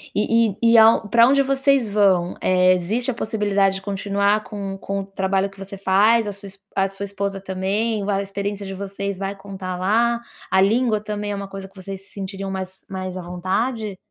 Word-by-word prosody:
E 225 Hz, +2 st, +3 dB
e 230 Hz, -1 st, +5 dB
e 230 Hz, -, +7 dB
ao 220 Hz, -1 st, +6 dB
pra 235 Hz, +3 st, +6 dB
onde 275 Hz, +1 st, +4 dB
vocês 270 Hz, -4 st, +2 dB
vão, 190 Hz, -4 st, +3 dB
eh, 185 Hz, 0 st, +4 dB
existe 215 Hz, +9 st, -1 dB
a -, -, -5 dB
possibilidade 205 Hz, -4 st, +1 dB
de 195 Hz, -, -5 dB
continuar 200 Hz, +1 st, 0 dB
com 200 Hz, -3 st, -6 dB
com 195 Hz, +1 st, -3 dB
o -, -, -7 dB
trabalho 195 Hz, 0 st, 0 dB
que 195 Hz, -, -19 dB
você 195 Hz, +1 st, -8 dB
faz, 205 Hz, +4 st, +4 dB
a -, -, -2 dB
sua 200 Hz, 0 st, -10 dB
es 195 Hz, 0 st, -12 dB, 0.2 s
a 195 Hz, 0 st, +2 dB
sua 195 Hz, +1 st, -8 dB
esposa 200 Hz, 0 st, -4 dB
também, 195 Hz, +3 st, -1 dB
vai 200 Hz, -1 st, 0 dB
a -, -, 0 dB
experiência 200 Hz, +1 st, -4 dB
de 195 Hz, -, -5 dB
vocês 200 Hz, 0 st, -4 dB
vai 195 Hz, +1 st, -3 dB
contar 195 Hz, -2 st, -6 dB
lá, 230 Hz, +5 st, +2 dB, 0.3 s
a 190 Hz, -, +4 dB
língua 220 Hz, +2 st, +2 dB
também 210 Hz, -1 st, -3 dB
é -, -, -2 dB
uma 200 Hz, 0 st, -5 dB
coisa 195 Hz, 0 st, -7 dB
que 190 Hz, -, -26 dB
vocês 195 Hz, 0 st, -7 dB
se -, -, -18 dB
sentiriam 195 Hz, 0 st, -5 dB
mais 190 Hz, -1 st, -4 dB, 0.2 s
mais 185 Hz, -1 st, -5 dB
à -, -, -4 dB
vontade? 195 Hz, +5 st, -2 dB
200 Hz, 215 wpm, -22 LUFS, 195-215 Hz, 0.3 s, e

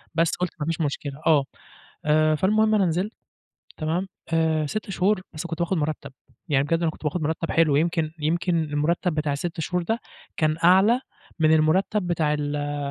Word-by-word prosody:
بس 165 Hz, 0 st, +2 dB
قُلت 180 Hz, -1 st, -1 dB
ما 150 Hz, -, -2 dB
فيش 165 Hz, 0 st, -1 dB
مشكلة، 140 Hz, -1 st, -2 dB
آه، 145 Hz, -4 st, +4 dB, 0.6 s
آآ، 155 Hz, 0 st, +3 dB
فالمهم 215 Hz, +6 st, +3 dB
أنا 195 Hz, -3 st, +3 dB
نزلت، 180 Hz, +6 st, -1 dB, 0.7 s
تمام؟ 170 Hz, +4 st, -1 dB, 0.3 s
آآ، 160 Hz, -2 st, +2 dB
6 210 Hz, +5 st, -4 dB
شهور 190 Hz, +1 st, +1 dB
بس 155 Hz, +3 st, -5 dB
كنت 165 Hz, 0 st, -5 dB
باخد 175 Hz, +2 st, 0 dB
مُرتّب 150 Hz, -2 st, -3 dB, 0.4 s
يعني 140 Hz, -1 st, +2 dB
بجد 165 Hz, +3 st, 0 dB
أنا 165 Hz, -, +2 dB
كنت 155 Hz, -, -15 dB
باخد 160 Hz, +2 st, -1 dB
مرتب 160 Hz, +2 st, -2 dB
حلو 155 Hz, -4 st, +3 dB
يمكن 165 Hz, 0 st, +1 dB
يمكن 170 Hz, +2 st, +1 dB
المرتّب 155 Hz, +3 st, 0 dB
بتاع 150 Hz, -2 st, -1 dB
ال6 165 Hz, +4 st, -4 dB
شهور 180 Hz, +2 st, -1 dB
ده 225 Hz, +6 st, 0 dB, 0.4 s
كان 155 Hz, 0 st, +2 dB
أعلى 195 Hz, +8 st, +5 dB, 0.4 s
من 155 Hz, 0 st, +5 dB
المرتّب 180 Hz, +5 st, +2 dB
بتاع 155 Hz, -3 st, +1 dB
ال 145 Hz, 0 st, -2 dB
160 Hz, 175 wpm, -24 LUFS, 150-180 Hz, 0.7 s, أعلى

